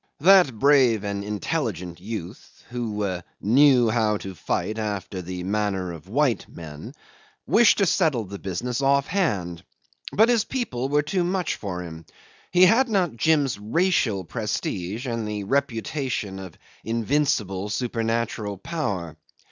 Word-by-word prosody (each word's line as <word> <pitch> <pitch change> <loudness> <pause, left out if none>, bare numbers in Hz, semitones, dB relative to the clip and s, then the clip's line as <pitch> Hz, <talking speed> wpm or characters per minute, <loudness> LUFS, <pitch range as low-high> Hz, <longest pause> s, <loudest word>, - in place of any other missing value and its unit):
That 180 - +6
brave 130 -5 +4
and 100 -1 -3
intelligent 105 - -3
youth 105 0 -8
("who 105 -6 -2 0.2
knew 125 +2 +5
how 110 -2 +1
to 95 -1 -7
fight 110 +6 -2
after 100 -3 -3
the 90 0 -6
manner 95 -2 -1
of 85 +2 -12
white 135 +1 +1
men") 75 -3 -10 0.5
wished 235 -1 +5
to 200 - +3
settle 145 -8 +2
the 100 0 -8
business 120 +8 -3
off 140 0 +3
hand, 95 - -1 0.5
but 220 +2 +5
his 235 -3 +3
people 165 - -3
were 145 +1 +2
too 180 +4 0
much 180 0 -1
for 90 -3 -5
him. 80 -2 -10 0.4
He 180 0 +6
had 235 +7 +4
not 185 - +1
Jim's 140 -4 +2
racial 115 - +1
prestige 95 +6 -3
and 115 -3 -3
the 105 -1 -3
reputation 115 -3 -2
of 95 -4 -10 0.3
invincible, 115 -5 0
supernatural 115 -2 -2
power. 95 - -3
115 Hz, 135 wpm, -24 LUFS, 95-145 Hz, 0.5 s, That